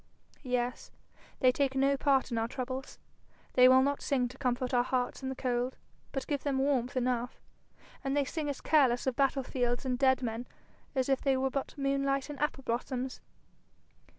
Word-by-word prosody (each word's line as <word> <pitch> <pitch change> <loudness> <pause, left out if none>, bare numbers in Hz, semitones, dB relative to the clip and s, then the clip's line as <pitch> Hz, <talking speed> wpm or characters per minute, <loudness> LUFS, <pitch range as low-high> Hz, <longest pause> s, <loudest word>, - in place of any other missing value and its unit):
'Yes; 250 -2 -2 0.5
they 255 - +6
take 270 0 0
no 275 +1 +3
part 270 -2 +2
in 230 - 0
our 225 - 0
troubles. 255 +1 -5 0.6
They 250 0 +7
will 260 0 +6
not 280 +1 0
sing 255 -3 +1
to 255 - -12
comfort 250 -1 -1
our 245 - +5
hearts 250 +1 -1
in 265 - -3
the 265 - -4
cold; 250 0 -1 0.3
but 270 - -3
give 285 -3 -2
them 280 -2 -1
warmth 265 -1 +1
enough, 245 -1 -1 0.6
and 275 +1 0
they 285 - +2
sing 300 +1 -3
as 280 - -4
careless 260 -6 +3
of 260 -2 0
battle 275 0 +2
fields 245 0 -1
and 250 -1 -1
dead 260 -1 +3
men 230 +1 -3 0.5
as 260 -1 +1
if 270 -1 +1
they 270 -2 +2
were 265 0 0
but 275 +2 -4
moonlight 275 0 0
and 285 - -8
apple 295 -2 -1
blossoms.' 255 +2 -3
260 Hz, 185 wpm, -31 LUFS, 250-275 Hz, 0.6 s, They